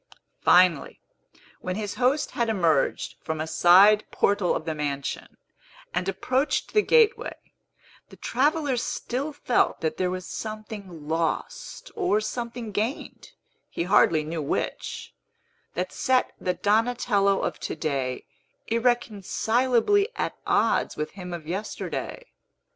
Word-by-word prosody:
Finally, 180 -5 +4 0.6
when 185 0 -4
his 205 -1 -3
host 260 +4 +1
had 235 -1 -1
emerged 170 -9 +1
from 160 -1 -3
a 155 - -1
side 190 +6 +6
portal 200 -3 +1
of 155 - -4
the 160 - -2
mansion, 145 -2 -4 0.6
and 180 +2 -1
approached 255 +9 -1
the 425 - +5
gateway, 465 +1 +3 0.7
the - - -13
traveller 285 +2 +1
still 255 +4 -3
felt 280 -4 +1
that 160 -1 -1
there 185 -1 0
was 185 0 -4
something 210 -7 -7
lost, 165 - -3
or 360 - +2
something 235 0 -5
gained 220 - -4 0.4
(he - - -3
hardly 170 -3 +4
knew 160 +1 -4
which), 140 - -3 0.6
that 180 +1 -2
set 260 -1 +1
the 180 - 0
Donatello 210 -2 +2
of - - -3
to - - -4
day 135 -5 -2 0.4
irreconcilably 240 - +1
at - - -2
odds - - +2
with 155 0 -3
him 180 -2 -8
of 170 -3 -6
yesterday. 205 - -5
205 Hz, 125 wpm, -26 LUFS, 170-245 Hz, 0.7 s, side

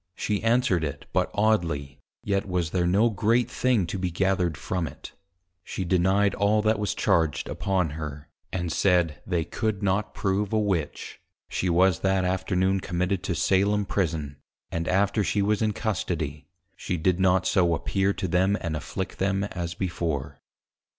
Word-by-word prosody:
_ - - -21
She 105 -2 -1
answered 115 -6 +2
it 75 -3 -4
but 90 -1 +1
oddly, 80 -10 0 0.2
yet 100 -1 0
was 90 -3 -1
there 90 -2 +1
no 105 +6 +3
great 115 +4 +1
thing 125 -7 +2
to 95 +3 -4
be 90 -1 -1
gathered 90 -2 0
from 90 +1 -2
it; - - -10 0.5
she 95 - -4
denied 95 +3 +3
all 105 +1 +2
that 110 -1 +2
was 105 - -1
charged 80 -9 +1
upon 95 -5 -1
her, 75 -1 -6 0.2
and 90 -2 -2
said, 85 -5 +2
They 85 -4 0
could 110 -3 -2
not 100 +2 0
prove 100 +1 -1
a 110 - +3
Witch; 95 -8 -2 0.3
she 90 - -1
was 90 0 +3
that 95 -1 +1
Afternoon 95 +1 +1
Committed 90 +1 -1
to 90 - -1
Salem 100 +3 +2
Prison; 80 -7 -2 0.3
and 85 0 -2
after 100 +3 +2
she 100 0 +1
was 105 0 +1
in 110 -1 +2
Custody, 85 -9 -3 0.3
she 90 - -3
did 90 +3 +1
not 95 -1 +3
so 85 -3 +3
appear 95 +7 0
to 95 -1 -3
them, 95 +4 +2
and 80 -2 -3
afflict 95 +5 -5
them 95 0 +1
as 85 -4 -4
before. 80 -6 -3
95 Hz, 170 wpm, -26 LUFS, 85-100 Hz, 0.5 s, no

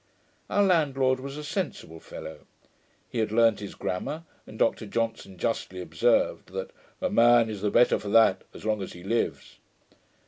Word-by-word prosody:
] - - -39
Our 205 - +3
landlord 135 -8 +2
was 140 +2 -7
a 150 - -6
sensible 150 - -4
fellow: 80 0 -10 0.6
he 120 - -4
had 110 -1 0
learnt 115 -1 +4
his 100 -1 -7
grammar, 150 - -3 0.2
and 110 - -11
Dr 110 - +1
Johnson 115 -3 -3
justly 95 -3 -2
observed, 90 - +1
that 95 0 -4 0.3
'a - - 0
man 120 -1 +5
is 105 -3 -6
the 105 - +1
better 120 - +4
for 100 - -6
that 105 -3 +5
as - - -12
long 110 -2 0
as 95 - -6
he 90 - -11
lives.' 115 +5 -2
115 Hz, 175 wpm, -27 LUFS, 100-130 Hz, 0.6 s, man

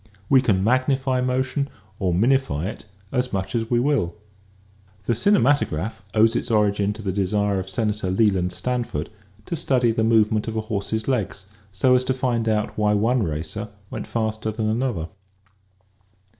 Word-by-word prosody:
We 135 -2 +6
can 95 -6 +2
magnify 130 +2 +1
motion 130 +2 0 0.3
or 95 -2 +1
minify 115 - +2
it 105 +2 -6 0.2
as 125 0 0
much 95 -1 -3
as 115 -1 -1
we 120 - +3
will. 125 -10 +1 0.9
The 120 - +2
cinemat 145 - +4
ograph 90 - -4
owes 110 +2 +4
its 120 - -1
origin 105 -2 +2
the 105 -3 -4
desire 100 +1 0
of 95 0 -5
Senator 105 -1 -1
Leland 95 -2 +2
Stanford 120 -7 -3 0.3
to 170 - -3
study 125 -6 +2
the 110 0 0
movement 110 -1 +3
of 110 - -3
a - - +1
horse's 110 0 -3
legs 105 -7 -1 0.3
so 125 +7 +3
as 125 0 +4
to 130 - 0
find 120 -3 0
out 105 -1 0
why 105 0 +3
one 115 +4 +2
racer 85 +5 -3 0.2
went - - -5
faster 110 -1 -2
than 110 0 -2
another. 110 -7 -1
110 Hz, 160 wpm, -23 LUFS, 100-125 Hz, 0.9 s, We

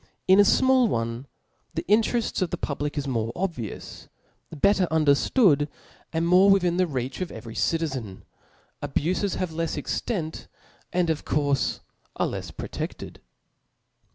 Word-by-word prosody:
In 190 +1 +6
a - - +10
fmall 260 +4 +4
one, 115 - -2 0.5
the - - -2
intereft 225 +2 +2
of 185 - +1
the - - -3
public 145 +1 -3
is 140 -1 -2
more 115 -3 -1
obvi 170 - -3
ous. - - -10 0.6
Setter 200 -2 +4
underftood, 150 - +3 0.4
and 165 +1 0
more 185 +3 +6
within 180 -3 +3
the 185 -1 +3
reach 130 +1 -4
of 180 - -3
every 115 0 -8
citizen; 135 - -2 0.6
abufes 185 +7 -1
have 180 -3 -2
lefs 165 0 -2
extent, 160 - -3 0.4
and 175 -2 +1
of 155 - -3
courfe 140 -3 0 0.3
are - - +1
lefs - - -4
prote6led. - - -6
165 Hz, 140 wpm, -25 LUFS, 140-190 Hz, 0.6 s, a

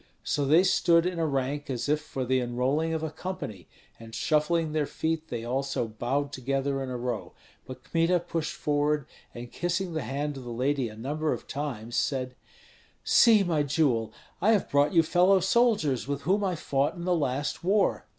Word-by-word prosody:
So 145 - 0
they 160 +6 +5
stood 170 -2 +3
in 180 -2 -2
a 165 - +1
rank 140 +1 -2
as 125 -1 -2
if 150 +1 +1
for 135 -4 -4
the 130 +1 +2
enrolling 130 +6 0
of 160 -1 -2
a 160 - -3
company, 155 - -6 0.3
and 115 -1 -10
shuffling 155 +5 +1
their 150 -2 0
feet 160 0 -2
they 115 -1 -5
also 135 -1 -1
bowed 135 +6 -2
together 135 +1 -1
in 135 - -4
a 125 - -3
row; 120 -2 -4 0.3
but 130 0 -9
Kmita 165 +4 +1
pushed 165 -2 -3
forward, 150 -1 0 0.3
and 120 0 -8
kissing 175 0 -2
the 160 - -2
hand 145 +2 -3
of 130 - -8
the 120 - -8
lady 130 +1 0
a 110 - -11
number 150 +7 -2
of - - -7
times, 125 -5 -4
said, 130 -2 -1 0.7
"See, 220 -4 +6
my 165 -5 +1
jewel, 135 -6 +1 0.3
I 215 +5 +4
have 205 - 0
brought 145 +1 +3
you 165 - +6
fellow 180 +4 +4
soldiers 190 - +2
with 140 0 -3
whom 195 +7 +1
I 185 -2 0
fought 140 -3 0
in 170 -1 -6
the 180 - +2
last 145 0 -2
war." 200 +3 +1
145 Hz, 190 wpm, -27 LUFS, 130-165 Hz, 0.7 s, See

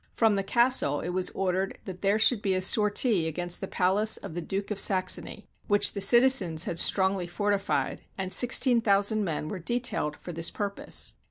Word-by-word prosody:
From 225 -2 +1
the 200 - -1
castle 235 - +1
it 170 - -6
was 185 +1 0
or 190 -2 -3
dered 190 +1 -3
that 185 -2 -9
there 200 +1 +1
should 220 0 +3
be 195 -2 -1
a 185 - -1
sortie 210 -2 +2
against 175 +2 -3
the 195 - -5
palace 200 +4 +1
of - - -10
the 175 - -5
Duke 195 +4 -5
of 205 - -4
Saxony, 190 +2 +1 0.2
which 205 0 +2
the 200 - -5
citizens 200 -7 +4
had 170 - -4
strongly 190 -2 +2
fortified, 205 +2 -2 0.2
and 190 -1 -4
16,000 225 -5 +2
men 155 -4 -4
were 185 - -6
detailed 205 -7 -2
for 175 - -10
this 165 +1 -1
purpose. 200 -1 -2
195 Hz, 185 wpm, -26 LUFS, 180-210 Hz, 0.2 s, citizens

